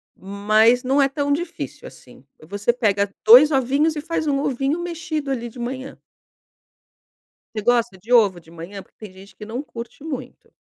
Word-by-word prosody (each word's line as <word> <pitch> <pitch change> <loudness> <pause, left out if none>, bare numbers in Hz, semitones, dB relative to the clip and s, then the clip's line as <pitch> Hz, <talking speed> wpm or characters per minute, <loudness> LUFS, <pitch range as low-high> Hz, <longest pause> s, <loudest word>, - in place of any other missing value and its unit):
mas 215 +5 +2
não 270 +3 +2
é 275 - +4
tão 285 +1 -2
difícil 345 +5 -4
assim, - - -16 0.2
você 205 +8 -1
pega 205 -4 +1 0.2
2 255 +8 +9
ovinhos 280 +4 +1
e 300 - -4
faz 315 -1 -3
um 275 -1 +1
ovinho 275 +4 -1
mexido 335 -5 -4
ali 240 -2 -3
de 240 - -13
manhã. 260 +3 -6 1.6
Você 215 - -3
gosta 240 -4 +1
de 225 +7 -7
ovo 205 -7 +5
de 160 - -25
manhã? 170 +4 -9
Porque - - -20
tem 210 -4 -10
gente 195 +1 -15
que 210 - -10
não 230 +4 -5
curte 235 +1 -10
muito. 265 -5 -8
245 Hz, 175 wpm, -21 LUFS, 210-280 Hz, 1.6 s, 2